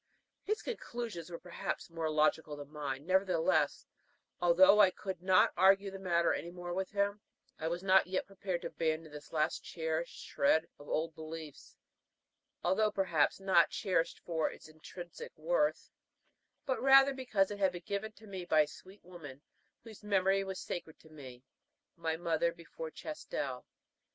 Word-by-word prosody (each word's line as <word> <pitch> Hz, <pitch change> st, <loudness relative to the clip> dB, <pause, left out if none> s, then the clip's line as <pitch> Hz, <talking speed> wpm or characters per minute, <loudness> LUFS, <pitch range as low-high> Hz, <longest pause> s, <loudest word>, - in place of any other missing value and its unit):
His 430 Hz, +1 st, -2 dB
conclusions 235 Hz, -, -5 dB
were 170 Hz, -, -6 dB
perhaps 175 Hz, -1 st, -5 dB
more 165 Hz, -1 st, -2 dB
logical 155 Hz, 0 st, +1 dB
than 145 Hz, 0 st, -9 dB
mine; 145 Hz, -2 st, -4 dB
nevertheless, 175 Hz, -5 st, +2 dB, 0.6 s
although 185 Hz, +4 st, +6 dB
I 200 Hz, -3 st, +8 dB
could 185 Hz, -1 st, -6 dB
not 185 Hz, 0 st, +4 dB
argue 195 Hz, +2 st, +4 dB
the 195 Hz, -, -8 dB
matter 170 Hz, -3 st, +2 dB
any 170 Hz, -, -4 dB
more 175 Hz, 0 st, -6 dB
with 190 Hz, +1 st, -2 dB
him, 200 Hz, 0 st, 0 dB, 0.4 s
I 160 Hz, -, -2 dB
was 175 Hz, +2 st, -3 dB
not 190 Hz, -1 st, +5 dB
yet 185 Hz, 0 st, -1 dB
prepared 190 Hz, -2 st, -4 dB
to -, -, -3 dB
abandon 160 Hz, -1 st, -2 dB
this 150 Hz, 0 st, -11 dB
last 155 Hz, -1 st, 0 dB
cherished 160 Hz, 0 st, -3 dB
shred 160 Hz, +3 st, +2 dB
of 145 Hz, -, -12 dB
old 160 Hz, +1 st, -1 dB
beliefs, 155 Hz, -1 st, -9 dB, 0.9 s
although 205 Hz, +4 st, +3 dB
perhaps 175 Hz, -7 st, +1 dB
not 190 Hz, -3 st, +4 dB
cherished 185 Hz, -5 st, 0 dB
for 160 Hz, -2 st, -1 dB
its -, -, -12 dB
intrinsic 165 Hz, +2 st, -10 dB
worth, 155 Hz, -1 st, 0 dB, 0.7 s
but 260 Hz, -2 st, -1 dB
rather 270 Hz, +1 st, +7 dB
because 220 Hz, -7 st, 0 dB
it 205 Hz, -, -5 dB
had 190 Hz, -2 st, +3 dB
been 175 Hz, -1 st, -8 dB
given 200 Hz, +2 st, -3 dB
to 220 Hz, +1 st, -16 dB
me 190 Hz, -3 st, -6 dB
by 155 Hz, -3 st, +4 dB
a 150 Hz, -, +1 dB
sweet 185 Hz, +6 st, -14 dB
woman 150 Hz, -6 st, -11 dB, 0.4 s
whose 220 Hz, -3 st, -12 dB
memory 195 Hz, -1 st, +2 dB
was 190 Hz, -1 st, -5 dB
sacred 160 Hz, -3 st, -6 dB
to 160 Hz, -, -18 dB
my 155 Hz, -2 st, -12 dB
heart 125 Hz, 0 st, -14 dB, 0.5 s
my 165 Hz, -2 st, -2 dB
mother 170 Hz, 0 st, +1 dB
before 165 Hz, -1 st, -8 dB
Chastel. 310 Hz, -, -5 dB
175 Hz, 165 wpm, -33 LUFS, 160-195 Hz, 0.9 s, I